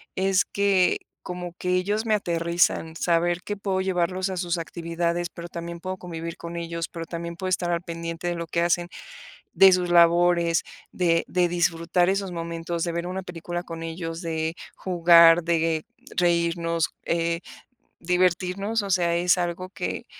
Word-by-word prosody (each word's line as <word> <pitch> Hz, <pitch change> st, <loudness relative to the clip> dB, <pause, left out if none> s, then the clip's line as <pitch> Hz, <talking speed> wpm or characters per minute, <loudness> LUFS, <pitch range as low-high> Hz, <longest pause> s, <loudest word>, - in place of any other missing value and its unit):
es 190 Hz, 0 st, +2 dB
que 200 Hz, -2 st, +2 dB, 0.3 s
como 180 Hz, -1 st, -6 dB
que 180 Hz, -, -3 dB
ellos 205 Hz, +5 st, 0 dB
me 220 Hz, -, +3 dB
aterrizan, 170 Hz, -3 st, 0 dB
saber 175 Hz, +1 st, +1 dB
que 205 Hz, -, -3 dB
puedo 195 Hz, -1 st, -2 dB
llevarlos 185 Hz, 0 st, 0 dB
a 190 Hz, -, -3 dB
sus 175 Hz, -1 st, -1 dB
actividades, 170 Hz, +1 st, -2 dB
pero 170 Hz, 0 st, -9 dB
también 170 Hz, 0 st, -7 dB
puedo 185 Hz, +2 st, -4 dB
convivir 165 Hz, -2 st, -6 dB
con 170 Hz, 0 st, -7 dB
ellos, 170 Hz, -1 st, -4 dB
pero 165 Hz, -1 st, -6 dB
también 170 Hz, 0 st, -6 dB
puedo 190 Hz, -1 st, -4 dB
estar 175 Hz, -1 st, 0 dB
al 170 Hz, -, +1 dB
pendiente 165 Hz, 0 st, -5 dB
de 175 Hz, -, -1 dB
lo 170 Hz, 0 st, -4 dB
que 170 Hz, +1 st, -2 dB
hacen, 175 Hz, 0 st, +1 dB, 0.6 s
de 195 Hz, -1 st, +8 dB
sus 180 Hz, -1 st, +1 dB
labores, 170 Hz, 0 st, +4 dB, 0.3 s
de 170 Hz, -2 st, +2 dB
de 180 Hz, -1 st, +2 dB
disfrutar 175 Hz, +1 st, +1 dB
esos 195 Hz, -1 st, -1 dB
momentos, 170 Hz, 0 st, -4 dB
de 170 Hz, -, -1 dB
ver 170 Hz, +1 st, -2 dB
una 185 Hz, +1 st, -3 dB
película 175 Hz, 0 st, -5 dB
con 165 Hz, -2 st, -7 dB
ellos, 165 Hz, +1 st, -5 dB
de 160 Hz, 0 st, -2 dB, 0.2 s
jugar, 170 Hz, -2 st, +6 dB
de 165 Hz, -1 st, 0 dB, 0.3 s
reírnos, 170 Hz, -1 st, +1 dB
eh, 170 Hz, 0 st, 0 dB, 0.6 s
divertirnos, 185 Hz, +4 st, +1 dB
o 200 Hz, -, -5 dB
sea, 175 Hz, -2 st, +2 dB
es 175 Hz, +1 st, +3 dB
algo 175 Hz, +1 st, -3 dB
que -, -, -4 dB
175 Hz, 165 wpm, -25 LUFS, 170-180 Hz, 0.6 s, de